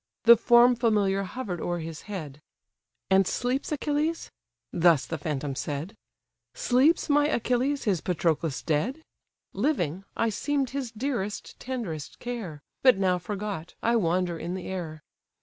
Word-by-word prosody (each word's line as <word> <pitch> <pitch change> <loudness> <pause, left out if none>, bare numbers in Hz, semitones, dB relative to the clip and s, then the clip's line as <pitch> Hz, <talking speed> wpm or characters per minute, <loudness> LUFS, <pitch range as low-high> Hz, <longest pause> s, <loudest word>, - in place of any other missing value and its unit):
The 235 0 +9
form 240 +2 +6
familiar 210 -5 +2
hover'd 195 -3 -5
o'er 175 0 -1
his 160 -1 -6
head, 150 -8 -6 0.7
"And 190 -1 +5
sleeps 255 +4 -1
Achilles? 300 +2 -1 0.4
(thus 170 -4 +4
the 160 - -4
phantom 145 -2 -3
said:) 145 +9 -4 0.6
Sleeps 310 - +3
my 290 -1 +4
Achilles, 255 +1 0
his 190 -7 +1
Patroclus 165 -4 -1
dead? 225 - -1 0.5
Living, 195 - 0
I 230 - +2
seem'd 275 +4 -1
his 265 -4 -3
dearest, 225 -4 -4
tenderest 215 - -5
care, 215 -12 -6 0.2
But 255 -6 +6
now 185 -2 +2
forgot, 195 -2 -5
I 235 +1 +3
wander 175 -4 +1
in 175 +2 -4
the 185 - -6
air. 160 -5 -5
200 Hz, 135 wpm, -27 LUFS, 170-250 Hz, 0.7 s, The